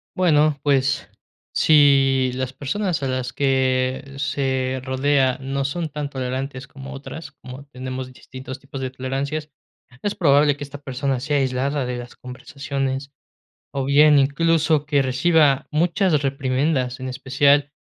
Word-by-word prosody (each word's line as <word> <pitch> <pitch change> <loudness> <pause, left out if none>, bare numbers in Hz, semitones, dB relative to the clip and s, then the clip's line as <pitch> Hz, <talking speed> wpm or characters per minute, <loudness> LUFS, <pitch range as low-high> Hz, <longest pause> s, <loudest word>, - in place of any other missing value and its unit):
Bueno, 155 -5 +3
pues, 135 -2 +1 0.5
si 135 -4 +4
las 130 0 -3
personas 160 +5 -2
a - - 0
las 130 0 -3
que 130 0 0
se 130 -2 -1
rodea 130 0 +1
no 135 +1 -2
son 160 +4 -3
tan 145 -1 -4
tolerantes 130 0 -4
como 135 0 -10
otras, 140 +2 -8
como 130 0 -11
tenemos 130 -1 -6
distintos 130 +1 -9
tipos 135 0 -8
de 130 - -2
tolerancias, 135 +4 -4 0.5
es 205 - -2
probable 145 -2 +4
que 145 - -6
esta 145 0 -9
persona 135 -1 -2
sea 145 +3 0
aislada 135 +1 0
de 125 0 -3
las 120 0 -9
conversaciones. 135 +1 -5 0.6
O 135 -1 -2
bien, 145 +2 +6
incluso 150 +2 +2
que 145 -2 +2
reciba 140 +2 +3
muchas 170 0 +2
reprimendas, 135 -1 0
en 130 - -4
especial 140 +2 +2
135 Hz, 140 wpm, -22 LUFS, 130-145 Hz, 0.6 s, bien